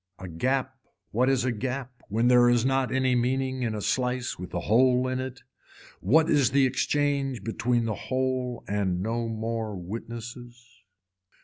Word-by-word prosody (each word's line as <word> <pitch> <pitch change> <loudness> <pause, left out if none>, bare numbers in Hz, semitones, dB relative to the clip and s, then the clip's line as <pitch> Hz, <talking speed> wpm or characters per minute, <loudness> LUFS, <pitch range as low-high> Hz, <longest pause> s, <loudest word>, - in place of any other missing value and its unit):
A 95 - -8
gap 130 +9 -1 0.3
what 125 +4 +2
is 130 -2 +2
a 130 - +1
gap 125 +2 -5
when 115 +4 +1
there 125 -1 +6
is 120 0 +3
not 135 -1 +1
any 130 -1 +2
meaning 130 +2 0
in 115 -3 -1
a 105 - -4
slice 125 -3 -1
with 90 0 -7
a 90 - -2
hole 125 +5 +3
in 130 0 -2
it. 130 -1 -6 0.6
What 155 - +4
is 140 -4 +3
the 135 0 +4
exchange 135 -2 0
between 115 +2 0
the 110 - -1
whole 130 +1 -2
and 95 -3 -1
no 115 +2 -1
more 110 -1 -3
witnesses. 120 +5 -8
125 Hz, 165 wpm, -27 LUFS, 115-130 Hz, 0.6 s, there